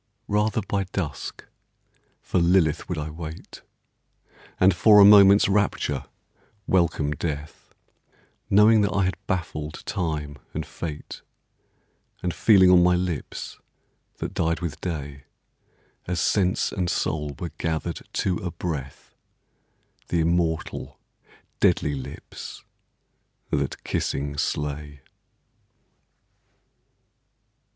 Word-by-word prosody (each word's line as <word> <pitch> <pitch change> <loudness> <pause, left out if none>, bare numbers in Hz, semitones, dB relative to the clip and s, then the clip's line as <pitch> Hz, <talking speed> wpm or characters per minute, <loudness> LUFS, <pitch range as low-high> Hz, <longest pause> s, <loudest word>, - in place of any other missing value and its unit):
Rather 105 +1 +1
by 100 0 -1
dusk 80 -8 -5 0.8
for 90 - 0
Lilith 85 -2 +2
would 90 - -2
I 75 0 -4
wait 80 0 -9 1.0
And 95 +1 +5
for 105 +4 +6
a 100 - +10
moment's 100 -1 +8
rapture 95 -9 0 0.6
welcome 85 -5 +1
death, 75 0 -6 0.7
Knowing 105 +2 +6
that 100 - +1
I 100 - +2
had 95 +1 -4
baffled 80 -4 -3
Time 75 -5 -3 0.2
and 80 0 -3
Fate, 75 0 -7 1.0
And 90 -1 -1
feeling 95 -4 +5
on 90 -1 +7
my 90 0 +4
lips, 90 -5 -4 0.6
that - - -5
died 85 0 0
with 80 -3 -5
day 70 -5 -5 0.8
As 90 -1 -1
sense 95 +1 +1
and 90 -2 -2
soul 75 -3 -2
were 85 -3 -5
gathered 80 +1 -2
to 95 - 0
a 95 -5 -4
breath, 80 -6 -6 0.9
The 85 - +1
immortal, 80 -1 -1 0.6
deadly 75 - +2
lips 70 0 -8 0.9
that - - -2
kissing 70 +1 -2
slay. 75 0 -3
85 Hz, 105 wpm, -25 LUFS, 75-95 Hz, 1.0 s, a